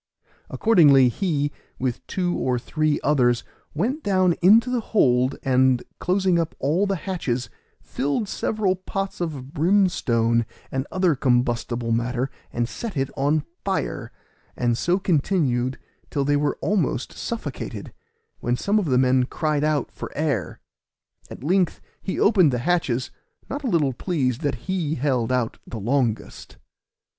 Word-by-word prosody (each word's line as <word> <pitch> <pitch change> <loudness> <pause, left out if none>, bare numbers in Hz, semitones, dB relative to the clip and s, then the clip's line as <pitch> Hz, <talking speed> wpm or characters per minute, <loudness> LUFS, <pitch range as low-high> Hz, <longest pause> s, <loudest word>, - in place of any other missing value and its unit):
Accordingly 145 - +5
he, 145 - -1 0.3
with 125 -2 -2
two 180 -2 -1
or 125 -1 0
three 155 +4 0
others, 125 -5 +2 0.3
went 245 - -1
down 185 - +3
into 225 +7 +6
the 250 - +1
hold, 130 - +2
and 130 -1 +3 0.2
closing 185 -1 +2
up 165 -1 -2
all 165 +9 +1
the 195 - 0
hatches, 155 -9 -3 0.3
filled 145 - -2
several 200 -2 0
pots 195 +1 -4
full 175 - 0
of 140 -3 -8
brimstone 140 - +2 0.2
and 135 +1 -2
other 185 -3 +2
combustible 120 -2 0
matter, 125 +3 -1 0.2
and 120 -1 -1
set 220 - -6
it 135 0 -1
on 145 +2 +1 0.2
fire, 195 -1 -2 0.5
and 120 -1 +1
so 175 +9 +1
continued 140 -8 +1 0.3
till 140 -2 -1
they 145 +1 +2
were 145 0 0
almost 175 - 0
suffocated, 230 -1 -5 0.5
when 120 +1 0
some 205 +8 +1
of 200 - -1
the 130 -5 +2
men 130 0 +3
cried 150 +1 -1
out 155 -1 0
for - - -7
air. 140 - -1 0.7
At - - -10
length 180 +2 +1 0.2
he 190 - -3
opened 185 -8 +5
the 125 - 0
hatches, 155 -8 0 0.4
not 285 +2 -4
a - - -1
little 150 - +2
pleased 130 -4 -1
that 145 -3 0
he 175 -5 -1
held 130 -4 0
out 125 -3 -1
the 115 - -6
longest. 120 0 -2
145 Hz, 145 wpm, -23 LUFS, 125-185 Hz, 0.7 s, into